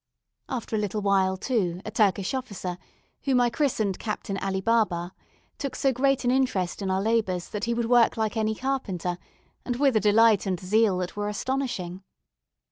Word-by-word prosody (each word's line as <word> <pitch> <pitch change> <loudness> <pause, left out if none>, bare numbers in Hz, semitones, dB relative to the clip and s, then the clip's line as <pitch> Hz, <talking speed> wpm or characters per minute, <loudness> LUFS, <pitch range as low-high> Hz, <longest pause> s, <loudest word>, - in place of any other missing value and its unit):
After 240 -4 -3
a - - +1
little 210 0 -2
while, 190 -1 +2
too, 185 -7 -1
a 215 - -5
Turkish 200 -2 +1
officer, 200 -9 -4 0.5
whom 265 -3 +3
I 240 -1 +3
christened 230 -8 0
Captain 210 -2 -4
Ali 190 -1 -1
Baba, 190 -5 +1 0.5
took 275 -2 -4
so 270 -1 +1
great 275 +1 +1
an 245 - +3
interest 230 -9 0
in 195 - -2
our 190 +1 0
labours 210 -6 0
that 210 +1 -3
he 235 0 0
would 235 0 0
work 240 -2 +4
like 220 0 -1
any 220 -1 0
carpenter, 195 -10 -2 0.4
and 245 - -2
with 270 -1 +2
a - - +5
delight 215 0 +4
and 185 -2 -1
zeal 205 +1 +2
that 180 0 -4
were 205 0 -2
astonishing. 210 -6 -3
215 Hz, 180 wpm, -26 LUFS, 190-245 Hz, 0.5 s, a